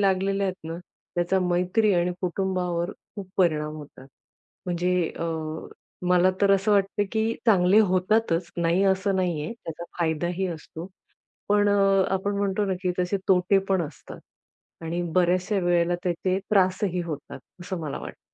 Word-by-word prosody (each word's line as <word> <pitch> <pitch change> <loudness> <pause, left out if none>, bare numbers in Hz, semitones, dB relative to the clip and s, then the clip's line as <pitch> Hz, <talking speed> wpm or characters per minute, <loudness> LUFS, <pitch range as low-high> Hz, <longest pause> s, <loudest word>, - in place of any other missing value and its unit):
लागलेल्या 195 0 +1
आहेत 185 -3 -5
ना, 165 - -5 0.4
त्याचा 175 +2 +1
मैत्री 180 +4 +2
आणि 175 0 +1
कुटुंबावर 180 -1 -1 0.3
खूप 195 -2 -7
परिणाम 155 -4 +1
होतात. 145 -3 -12 0.6
म्हणजे 180 +1 0 0.3
अ, - - -2 0.8
मला 180 +1 +5
तर 200 -1 +4
असं 195 +2 +2
वाटतं, 200 0 +2
की 220 0 +1
चांगले 195 -1 +5
होतातच, 185 -2 +1
नाही 170 +2 +2
असं 195 0 +2
नाहीये. 170 -4 -1
त्याचा 165 +1 -6
फायदाही 175 +3 0
असतो. 165 0 -7 0.6
पण 205 0 +3
अ, 195 -1 +4
आपण 200 +1 -1
म्हणतो 200 0 0
ना, 190 - 0
की 180 -1 +1
तसे 180 +2 +1
तोटे 190 +1 +4
पण 190 -2 +2
असतात 150 - -12 0.7
आणि 170 +2 -2
बऱ्याचशा 185 +3 +2
वेळेला 175 0 +2
त्याचे 185 +1 0
त्रासही 185 -2 +2
होतात. 150 -4 -7 0.2
असं 185 0 -4
मला 150 -3 -4
वाटतं. - - -9
185 Hz, 145 wpm, -25 LUFS, 175-195 Hz, 0.8 s, मला